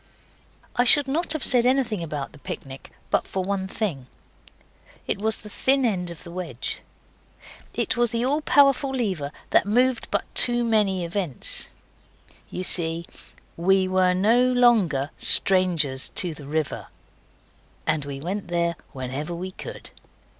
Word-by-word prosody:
I 245 - +3
should 280 +3 +4
not 315 +6 -1
have 310 - -3
said 245 -2 +5
anything 250 -6 +1
about 150 -4 -5
the 150 - -16
picnic 135 0 -8 0.2
but - - +1
for 190 - -3
one 190 0 -2
thing. 175 - -4 1.0
It - - -2
was 220 +1 +3
the 210 - -11
thin 265 +5 +1
edge 180 -6 -1
of 170 -2 -9
the 170 - -10
wedge. 170 -9 -4 0.9
It - - 0
was 240 -1 +2
the 235 +1 -1
all 290 +4 0
powerful 280 -2 +4
lever 195 - -2 0.2
that - - +4
moved 250 +4 +1
but - - 0
too 240 0 +3
many 205 -6 +1
events. 170 - -3 0.8
You 180 - -5
see, 165 -2 +1 0.5
WE 190 +2 +2
WERE 185 -1 +2
NO 220 +6 +3
LONGER 195 - +3
STRANGERS 170 -8 +4
TO 175 -3 -1
THE 150 -2 -12
RIVER. 155 0 -3 1.0
And 155 -2 0
we 140 -1 -6
went 185 +6 -4
there 170 -1 -1 0.2
whenever 135 +6 -5
we 185 +2 -6
could. - - -8
185 Hz, 145 wpm, -24 LUFS, 160-235 Hz, 1.0 s, said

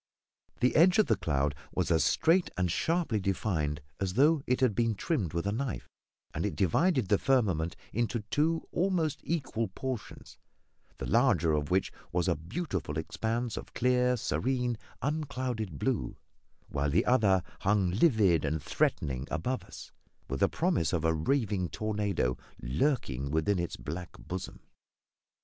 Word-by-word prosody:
The 125 - +3
edge 180 +5 +6
of 215 - +5
the 110 - +2
cloud 75 -6 0 0.2
was - - 0
as 80 -1 +4
straight 170 +3 +3
and 90 -2 +1
sharply 165 - 0
defined 85 -6 -1 0.2
as 95 -2 -2
though 150 +4 +4
it 125 - +2
had 130 -5 +3
been 115 0 +1
trimmed 105 - -1
with 85 +1 -1
a 100 - +1
knife, 125 +4 -3 0.5
and - - -2
it - - -1
divided 125 - +2
the 100 0 +3
firmament 95 -12 +1 0.2
into 120 +1 0
two 160 +2 +1
almost 170 -5 0
equal 135 -9 -1
portions, 115 +2 -6 0.6
the - - -5
larger 105 - +3
of 75 0 0
which 95 +1 +1 0.2
was 85 0 0
a - - +4
beautiful 85 - -4
expanse 115 +8 -2
of - - -8
clear, 125 0 +2
serene, 125 0 0 0.3
unclouded 130 - -2
blue; - - -1 0.5
while 70 0 -1
the 80 +5 +2
other 100 -8 +4 0.2
hung 100 -3 +2
livid 100 - +4
and 75 0 -1
threatening 70 -2 0
above 125 +11 -2
us, - - -11 0.4
with 65 +1 -3
the - - +4
promise 80 -1 0
of 80 -2 0
a 80 - +3
raving 100 - 0
tornado 105 -11 -1 0.2
lurking 70 - -1
within 80 +6 +1
its 85 - -3
black 80 +6 -6
bosom. 95 +1 -7
105 Hz, 150 wpm, -30 LUFS, 80-130 Hz, 0.6 s, edge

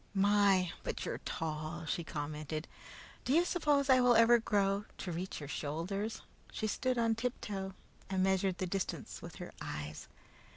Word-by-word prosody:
"My, 200 -2 +4
but - - -3
you're - - -3
tall!" 155 +1 -4
she 170 - -1
commented. 155 +1 -4 0.6
"Do 255 - +1
you 340 +3 +5
suppose 295 -6 +2
I 260 -1 +7
ever 240 -2 +6
will 240 - +7
grow 200 -2 +1
to 180 - -4
reach 180 +3 -4
your 145 - -6
shoulders?" 175 +10 -3 0.3
She - - -3
stood 250 +4 0
on 230 -1 +3
tiptoe 210 -5 -3 0.3
and 190 -1 +1
measured 190 -1 +2
the 185 - -1
distance 190 +1 -3
with - - -8
her - - -7
eyes. 75 +1 -5
195 Hz, 160 wpm, -34 LUFS, 165-225 Hz, 0.6 s, I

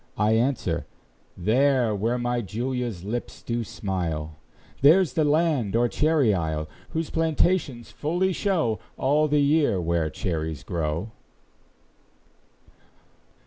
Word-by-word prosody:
I 105 +1 +2
answer, 120 +4 0 0.5
"There, 120 +4 +2
Where 115 +5 0
my 120 0 -1
Julia's 120 -2 -3
lips 115 +5 -5
do 120 0 -2
smile;" 80 -8 -4 0.4
There's 160 +2 +5
the 160 - +2
land, 150 - +1
or 120 +1 +3
cherry 150 -4 +2
isle, 80 -4 -2 0.2
Whose 160 -1 -3
plantations 160 - 0
fully 180 +5 0
show 165 - 0 0.2
All 150 +3 +2
the 150 0 +2
year 145 - +3
where 85 -2 0
cherries 80 -2 -3
grow! 85 +4 -3
120 Hz, 110 wpm, -25 LUFS, 95-150 Hz, 0.5 s, There's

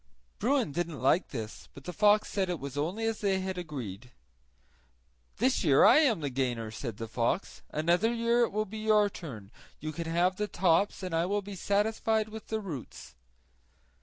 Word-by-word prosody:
Bruin 265 - +1
didn't 170 -2 -3
like 135 +9 +3
this, 110 -4 -7
but 140 - -11
the 180 - -6
fox 210 +3 +4
said 190 -2 -1
it 175 -3 -2
was 140 -1 -6
only 175 +10 -2
as 225 -1 -1
they 195 -2 +1
had 190 0 -3
agreed. 125 - -6 1.3
"This 255 +1 +2
year 140 -5 +6
I 230 - +8
am 245 - +3
the 140 -2 -2
gainer," 120 -4 -2
said 115 -2 -6
the 115 - -5
fox; 115 - -1
"another 175 +8 +2
year 235 0 +2
it - - -7
will 215 +1 0
be 215 +2 -7
your 215 -1 +3
turn; 115 - -9 0.3
you 155 +1 -4
can 165 +2 -5
then 165 - -3
have 180 +2 +2
the 210 - -1
tops 190 +1 +1
and 180 -2 -4
I 165 +2 +1
will 205 +1 0
be 200 +1 -8
satisfied 215 +3 0
with 220 0 -9
the 220 - -2
roots." 150 - -8
180 Hz, 190 wpm, -30 LUFS, 140-210 Hz, 1.3 s, I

